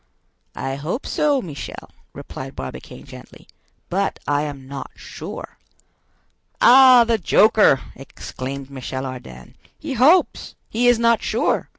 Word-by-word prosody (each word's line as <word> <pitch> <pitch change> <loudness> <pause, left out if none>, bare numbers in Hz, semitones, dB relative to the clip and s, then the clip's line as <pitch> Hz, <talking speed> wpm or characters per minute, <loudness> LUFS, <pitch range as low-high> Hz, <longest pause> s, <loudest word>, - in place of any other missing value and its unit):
"I 135 0 -4
hope 160 - -4
so, 285 -4 0
Michel," 150 -5 -9 0.2
replied - - -9
Barbicane - - -9
gently, - - -14 0.4
"but 195 +2 -2
I 145 0 +1
am 140 -3 -7
not 140 0 -7
sure." - - -10 1.0
"Ah, 255 -1 +7
the 230 -1 0
joker!" 210 -6 +4 0.2
exclaimed 135 0 -8
Michel 130 0 -6
Ardan. 65 - -10 0.2
"He 305 -3 -6
hopes!—He 255 -4 +1
is 245 -1 +5
not 235 0 +2
sure! - - -1
175 Hz, 115 wpm, -21 LUFS, -, 1.0 s, Ah